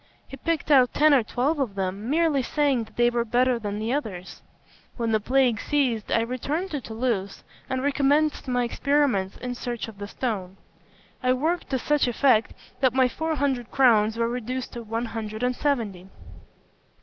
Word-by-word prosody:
He - - -9
picked 310 +2 -2
out 255 -3 +5
ten 305 0 +5
or 270 - +5
twelve 265 +7 -1
of 240 -8 -2
them, 195 +3 -3
merely 310 -2 +2
saying 275 -3 0
that 220 - -21
they 240 0 +3
were 235 -1 0
better 245 +1 +2
than 205 -2 -4
the 220 +3 -2
others. 195 -11 -5 0.6
When 230 -2 -1
the 220 - +3
plague 250 0 +2
ceased, 255 -7 0
I 230 - +3
returned 280 +10 -3
to 290 -3 -3
Toulouse, 220 -4 -3 0.3
and 260 0 -2
recommenced 285 +2 +1
my 245 -1 +1
experiments 245 -6 0
in 250 0 -4
search 240 -1 -4
of 215 -3 -12
the 205 - -5
stone. 195 -6 -4 0.6
I 255 0 +3
worked 320 +7 -1
to 265 - 0
such 295 +2 +1
effect 240 -2 +2 0.2
that 260 -2 +2
my 260 -1 +5
four 320 +5 -2
hundred 265 -5 -1
crowns 225 -4 +3
were 230 0 +1
reduced 250 +2 -4
to 240 - -6
one 225 +1 -3
hundred 220 0 -5
and 250 0 +1
seventy. 220 -12 -2
245 Hz, 180 wpm, -25 LUFS, 225-275 Hz, 0.6 s, out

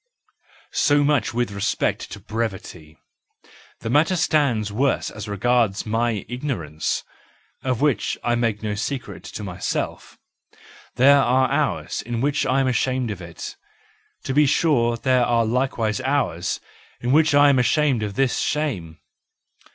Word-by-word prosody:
So 145 0 +3
much 145 -3 +1
with 120 -2 -1
respect 100 -1 -1
to - - -7
brevity; 95 -8 -5 0.8
the 115 - -4
matter 155 +7 +3
stands 140 - +1
worse 135 +5 0
as 105 0 -8
regards 110 0 +1
my 115 -1 -1
ignorance, 90 - -3 0.6
of 130 -2 -1
which 145 -8 +1
I 120 - +1
make 115 -3 0
no 105 -1 -1
secret 125 +5 -4
to 105 - -7
myself. 90 -3 -4 0.8
There 140 +4 +6
are 130 +1 +2
hours 145 +1 -1
in 120 -1 -4
which 145 +3 0
I 135 +1 +2
am 135 - +1
ashamed 130 -1 0
of 95 -3 -7
it; 85 0 -8 0.7
to 135 - -3
be 150 +1 +4
sure 120 -6 +2
there 130 0 +2
are 115 -1 +2
likewise 115 -2 0
hours 130 - -1 0.4
in 120 - -1
which 155 0 +4
I 145 0 +7
am 135 -2 +4
ashamed 135 -1 +2
of 105 -2 -4
this 135 0 +1
shame. 100 - -2
120 Hz, 145 wpm, -22 LUFS, 105-140 Hz, 0.8 s, I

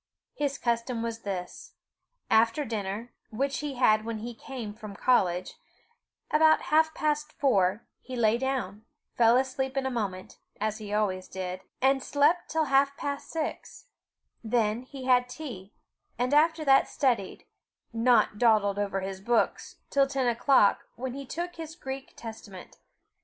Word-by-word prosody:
His 280 -1 -2
custom 235 0 -1
was 230 -1 -3
this: 190 -4 -6 0.6
after 230 +6 +3
dinner, 215 +1 -4 0.2
which 275 +5 -2
he 290 -2 -4
had 215 -4 +4
when 230 0 -4
he 235 +3 -6
came 230 -2 -7
from 215 -2 -10
college, 185 -7 +1 0.7
about 315 +1 +5
half 315 0 +4
past 300 0 -1
four, 205 -6 +1
he 260 - -8
lay 230 -1 +2
down, 245 -6 -2 0.3
fell 235 0 +5
asleep 265 +1 -1
in 270 - 0
a 265 - -1
moment, 195 -6 -4 0.2
as 215 +1 -2
he 210 -1 -7
always 195 -3 0
did, 185 0 -5 0.2
and 270 0 +4
slept 300 +6 +2
till 320 -1 +1
half 275 0 +2
past 280 0 -4
six; 320 -2 -5 0.5
then 225 0 +1
he 260 0 -9
had 250 -1 +3
tea, 250 -8 -8 0.5
and 250 +4 0
after 315 +1 +3
that, 270 -1 +5
studied 240 -9 -1 0.5
not 230 -2 +3
dawdled 210 -4 +3
over 195 -1 -1
his 190 0 -5
books, 235 +3 0 0.2
till 275 -1 +4
ten 270 -1 -1
o'clock, 240 -2 +3
when 255 +1 -4
he 275 0 -7
took 345 +5 -5
his 320 -1 -7
Greek 270 -4 -7
Testament. 220 -5 -10
240 Hz, 150 wpm, -28 LUFS, 210-275 Hz, 0.7 s, about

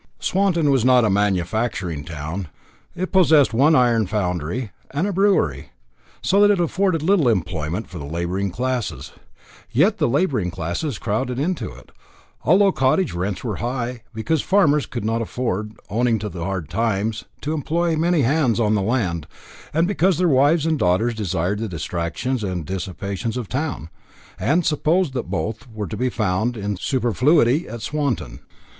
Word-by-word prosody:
Swanton 180 -6 +2
was 135 -4 +2
not 125 -2 +5
a 105 - +2
manufacturing 95 -4 0
town. 85 +3 -5 0.5
It 185 +1 -3
possessed 160 -8 +5
one 145 +7 +4
iron 120 -5 +3
foundry 90 - -2 0.2
and 145 +7 -1
a 205 - -1
brewery, 180 - +1 0.5
so 200 +2 +3
that 205 - +6
it 205 -3 +3
afforded 175 -1 +1
little 170 -7 +3
employment 85 -1 -2
for 90 - -8
the 70 - -6
labouring 85 +6 -2
classes, 125 +4 -3 0.6
yet - - +2
the - - +2
labouring 130 - +1
classes 95 - -3
crowded 120 +4 -2
into 160 - -2
it, 60 +1 -15 0.5
although 195 +4 +5
cottage 140 - +1
rents 90 +3 -3
were 110 -6 -3
high, 120 0 -3
because 130 +8 -1
the - - -14
farmers 150 -7 +3
could 120 -4 -5
not 115 +1 0
afford, 110 -3 -3 0.2
owing 115 +1 +2
to 105 0 -4
the 85 -2 -6
hard 95 -5 -3
times, 110 +1 -1 0.2
to 150 - -2
employ 165 +3 0
many 165 0 +2
hands 130 -3 +2
on 110 -2 +2
the 105 - +2
land, 95 - -1 0.4
and 165 +3 +2
because 190 -3 +2
their 180 0 +2
wives 145 +2 +3
and 160 -2 +1
daughters 95 +7 +2
desired 100 -2 -1
the 110 -1 -3
distractions 85 +9 -3
and 90 -5 -3
dissipations 95 +5 -4
of 125 - -3
a - - -22
town, 135 - -3 0.5
and 165 +5 +2
supposed 160 0 +1
that 125 -3 -4
both 115 +4 -3
were 110 -1 -4
to 85 - -5
be 130 +1 0
found 110 +2 -1
in 105 -1 -2
superfluity 130 - +2
at 115 -1 -7
Swanton. 135 - -2
120 Hz, 165 wpm, -22 LUFS, 95-150 Hz, 0.6 s, that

